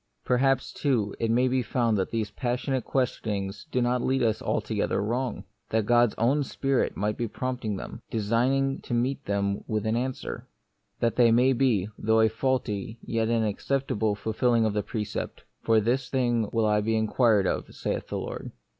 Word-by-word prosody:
Perhaps, 135 +2 +2
too, 115 -8 0
it 115 - 0
may 125 +3 +3
be 130 0 +1
found 115 -1 +1
that 95 -2 0
these 110 -2 -2
passionate 125 +2 -1
questionings 105 -4 -2
do 125 -1 +1
not 125 0 +1
lead 130 +1 +1
us 110 -2 +1
altogether - - -1
wrong; 120 +4 -2 0.3
that 110 -1 +1
God's 120 0 +4
own 135 +6 +2
Spirit 135 0 -1
may 105 +2 +1
be 115 +2 -3
prompting 125 -2 -3
them, - - -7
designing 125 +6 +1
to 120 - -3
meet 125 +3 0
them 100 0 -1
with 110 -1 -1
an 110 +1 +1
an 120 - +1
The - - -1
Mystery 130 - -6
of - - -4
Pain. - - -11
swer; - - -48
that 115 -1 +1
they 120 -2 +6
may 125 +3 +4
be, 120 -7 +2
though 110 +1 +3
a 110 - +5
faulty, 110 -3 -2
yet 115 -1 -1
an 115 -1 +2
acceptable, 110 -1 0
fulfilling 110 +3 +1
of 110 - 0
the 105 - +1
precept: 105 -1 -4 0.2
"For 115 -1 +4
this 125 +4 0
thing 120 -5 +1
will 115 -1 +1
I 105 0 +3
be 110 +2 0
inquired 110 -2 +3
of, - - -2
saith - - -3
the - - -3
Lord." - - -5
115 Hz, 195 wpm, -27 LUFS, 105-125 Hz, 0.3 s, they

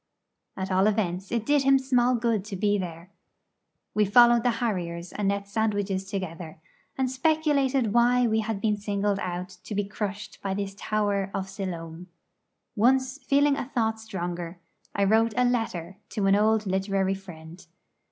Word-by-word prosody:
At 190 0 -3
all 190 +2 +4
events 195 -3 -1
it 230 -2 -1
did 290 -1 +3
him 270 0 +5
small 255 -2 +2
good 230 -4 0
to 210 -2 -6
be 205 +1 +1
there. 170 0 -7 0.8
We 210 - +3
followed 240 +3 +6
the 245 - +2
harriers 180 -7 -3
and 200 -1 0
ate 200 0 -3
sandwiches 200 -2 -1
together, 175 -4 -5 0.4
and 265 -1 +1
speculated 275 -5 +1
why 245 +1 +4
we 220 -1 +2
had 220 -2 -2
been 210 -1 +1
singled 205 -1 -1
out 180 0 -4
to 210 - -6
be 205 - +1
crushed 205 0 -5
by 195 -1 -2
this 200 -1 -3
tower 205 -2 -1
of 190 0 -3
Siloam. 175 -3 -6 0.7
Once, 260 +4 +2
feeling 280 +1 +3
a 260 - -5
thought 220 -2 +1
stronger, 175 -5 -5 0.4
I 200 - +2
wrote 220 +2 +3
a 250 - +4
letter 195 -7 -2 0.2
to 210 -3 0
an 195 0 +5
old 215 +1 +2
literary 190 0 0
friend. 175 -3 -11
205 Hz, 160 wpm, -26 LUFS, 190-235 Hz, 0.8 s, followed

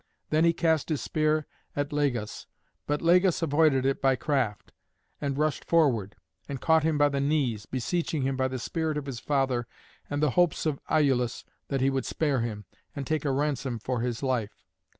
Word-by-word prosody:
Then 155 +2 +4
he 170 - +6
cast 165 -2 +1
his 155 -3 0
spear 155 0 0 0.3
at 145 0 -2
Lagus; 130 -7 -1 0.4
but 145 +2 -1
Lagus 180 +1 +4
avoided 145 -3 +3
it 135 0 0
by 135 -1 +4
craft, 130 -7 -1 0.5
and 140 -2 -2
rushed 155 0 0
forward, 130 - +2 0.3
and 140 -2 -4
caught 160 +4 +4
him 155 -1 +1
by 145 0 +5
the 140 -1 -1
knees, 135 -8 0
beseeching 155 +3 -1
him 135 0 0
by 130 0 +1
the 130 0 -4
spirit 160 +4 -2
of 145 - -4
his 135 -4 -5
father 130 -4 0 0.4
and 145 - -2
the 150 - +3
hopes 175 +2 +2
of 150 -3 -1
Iülus 130 -6 +2 0.2
that 135 -2 -1
he 135 +1 +3
would 135 -1 -1
spare 145 -5 0
him, 110 -3 -4 0.3
and 140 - -4
take 155 +2 -1
a 140 - +2
ransom 135 -3 -1
for 120 +2 -2
his 120 +1 -3
life. 120 -6 -2
140 Hz, 190 wpm, -28 LUFS, 130-155 Hz, 0.5 s, he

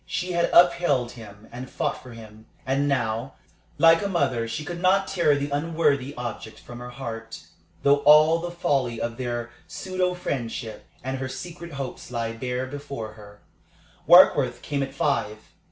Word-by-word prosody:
She 180 +1 -3
had 170 -1 +1
upheld 170 -8 +4
him 110 -3 -13
and 125 +2 -8
fought - - -2
for 125 -2 -12
him. 110 -1 -13 0.2
And 135 +2 +1
now, 120 -1 -1 0.4
like 165 0 +6
a - - 0
mother, 130 -10 0
she 135 +7 -5
could 175 +2 -6
not 195 +1 +3
tear 170 -6 +2
the 145 0 -3
unworthy 145 -2 0
object 120 -2 -6
from 120 0 -11
her 125 0 -8
heart, 115 -3 -7 0.4
though 140 0 +5
all 155 +3 +6
the 175 +1 -4
folly 135 -9 -1
of 115 0 -3
their 120 -2 -4 0.2
pseudo 185 0 -2
friendship 115 -8 -5 0.2
and 130 +1 -3
her 130 0 -4
secret 170 +5 -8
hopes 135 -2 -6
lay 115 -1 -3
bare 125 +2 -3
before 140 -5 -7
her. 105 -1 -15 0.7
Warkworth 145 -8 +6
came 145 -2 -2
at 135 0 -4
five. 110 -5 0
135 Hz, 165 wpm, -25 LUFS, 120-165 Hz, 0.7 s, like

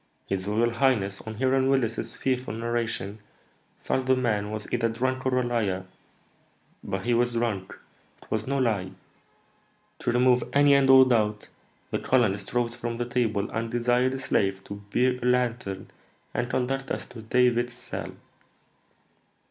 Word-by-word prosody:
His 95 0 -3
royal 115 +3 +2
highness, 115 -6 +1
on 110 - -5
hearing 130 +2 +2
Willis's 115 -4 0
fearful 130 -3 -2
narration, 115 -3 -2 0.6
thought 130 0 -1
the 130 - +5
man 105 -5 0
was 110 -1 -5
either 115 -1 +2
drunk 130 +3 -1
or 130 -1 +1
a - - +1
liar; 105 -6 -1 1.0
but 95 0 -4
he 120 - +2
was 120 +1 +2
drunk, 115 -5 -2 0.5
it - - -23
was 110 +1 -1
no 140 +1 0
lie. 105 -8 0 1.1
To - - 0
remove 125 0 +4
any 145 0 +6
and 140 -1 +4
all 130 0 +9
doubt, 105 -4 +1 0.4
the - - 0
colonist 105 -6 +1
rose 120 -1 +1
from 120 -1 -4
the 120 - -1
table, 120 -4 0
and 115 +1 -2
desired 125 +2 +1
a - - -4
slave 95 -6 0
to 100 +1 -8
bear 125 0 +2
a - - -3
lantern 120 -6 -1 0.4
and 120 - -1
conduct 135 +2 -1
us - - -3
to 115 - -11
David's 120 +1 +2
cell." 120 - -6
120 Hz, 155 wpm, -26 LUFS, 110-125 Hz, 1.1 s, all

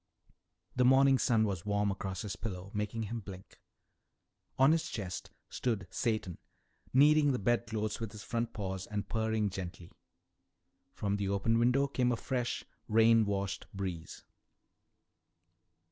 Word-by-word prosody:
The 125 - +3
morning 135 +1 +6
sun 115 -3 +3
was 95 -5 -1
warm 105 0 +1
across 95 -1 -4
his 105 - -4
pillow, 95 -3 -6
making 105 +2 -2
him 115 +2 -4
blink. 95 -2 -11 1.0
On 135 +3 +6
his 165 0 +1
chest 95 -4 -5 0.2
stood 115 -5 -2
Satan, 110 -7 -1 0.5
kneading 145 +1 +5
the - - 0
bedclothes 110 -1 -1
with 115 -3 -4
his 105 -1 -9
front 115 +1 -2
paws 95 -3 -4
and 105 0 -3
purring 110 -2 0
gently. 90 -2 -7 1.0
From 100 -1 -2
the 100 -1 -1
open 100 +4 +2
window 125 +4 +3
came 125 -3 +1
a 120 - 0
fresh, 125 -1 -2 0.2
rain 115 0 +5
washed 100 -1 -2
breeze. 90 -4 -5
110 Hz, 135 wpm, -32 LUFS, 100-120 Hz, 1.0 s, morning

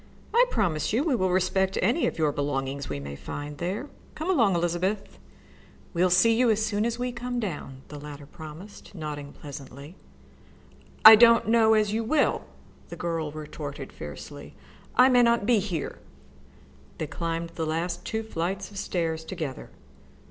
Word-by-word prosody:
I 485 +2 +6
promise 175 - 0
you 245 +6 +2
we 310 -4 +1
will 185 -6 +1
respect 190 +1 +1
any 235 - +2
of - - -3
your 155 -2 +2
belongings 140 -1 -3
we 75 - -3
may 70 0 -7
find 145 - -7
there. 195 +10 -3 0.3
Come 320 +5 -1
along, 225 - +3
Elizabeth." 175 +4 -1 0.7
"We'll 180 +1 +3
see 190 +6 +5
you 240 +1 +3
as 220 0 +1 0.3
we 250 0 -2
come 245 0 -4
down," 145 - -5
the 150 - -8
latter 145 -1 -9
promised, 160 +8 -11
nodding 150 -3 -6
pleasantly, 140 +2 -10 1.1
"I 220 0 +14
don't 230 0 +6
know 220 -1 +5
as 210 -1 +2
you 225 +1 0
will," 285 +6 +1 0.4
the - - -7
girl 165 -3 -2
retorted 145 -2 -7
fiercely. 75 -1 -9 0.4
"I 255 - +7
may 250 -2 +5
not 235 -3 +3
be 235 -1 +4
here." 185 -6 -4 1.0
They 155 - -2
climbed 165 +2 -3
the 165 -1 -4
last 170 +2 -2
two 220 0 -3
flights 190 -1 -3
of 200 - -10
stairs 165 -4 -2
together. 160 -6 -6
175 Hz, 155 wpm, -26 LUFS, 150-220 Hz, 1.1 s, I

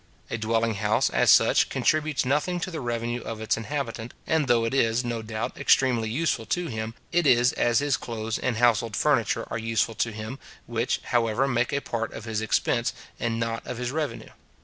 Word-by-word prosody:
A - - -1
dwelling 115 +1 +1
house, 100 - +1
as - - +3
such, - - +5
contributes 155 -3 +1
nothing 150 +7 0
to 185 - -3
the 160 - -4
revenue 120 0 -2
of 115 -1 -6
its 110 - +1
inhabitant; 120 -1 -4
and 160 -3 +1
though 115 -2 +3
it 115 - -2
is, 120 -2 +2
no 120 -1 -2
doubt, 110 0 -4
extremely 120 -4 +3
useful 125 -3 -1
to 175 +9 -1
him, 110 -1 -4 0.2
it 175 -3 +2
is 125 -1 +5
as 120 -1 +2
his 145 -4 +1
clothes 110 -1 -4
and 125 -3 -1
household 115 -2 +2
furniture 130 -3 +1
are - - -2
useful 115 0 0
to 115 - -1
him, 110 +5 -7 0.3
which, 120 +1 -1
however, 120 +2 +1
make 120 -2 0
a 140 - 0
part 115 -3 -3
of 115 - -8
his 110 -1 -2
expense, 120 +1 +1 0.3
and 115 -1 -1
not 115 0 -2
of 125 - -4
his 125 0 -3
revenue. 150 0 -4
120 Hz, 195 wpm, -26 LUFS, 115-135 Hz, 0.3 s, such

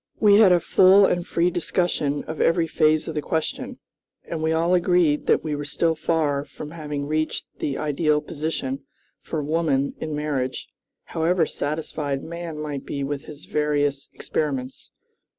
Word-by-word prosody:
We 205 -1 +6
had 205 -4 +7
a 175 - +5
full 190 +4 +6
and 175 -2 0
free 175 +1 +1
discussion 160 -4 -1
of 160 - -5
every 165 0 +3
phase 155 0 +2
of 160 - -3
the 150 - -1
question, 160 +1 -3 0.5
and 165 -2 -4
we 160 0 +1
all 165 +2 +2
agreed 175 -4 +3
that - - +3
we 155 -2 -2
were 145 - -4
still 165 +3 0
far 155 -3 0
from 150 0 -9
having 150 -3 -4
reached 155 +1 -1
the 140 - -2
ideal 150 0 +1
position 140 -3 -4 0.4
for 155 -3 -3
woman 145 -3 +1
in 155 -1 -3
marriage, 145 -4 -2 0.4
however 165 +1 +1
satisfied 145 -2 -3
man 170 -1 -6
might 150 -3 -4
be 140 -1 -4
with 140 0 -4
his 150 -1 -11
various 145 -2 0
experiments. 135 -4 -3
155 Hz, 160 wpm, -24 LUFS, 145-165 Hz, 0.5 s, had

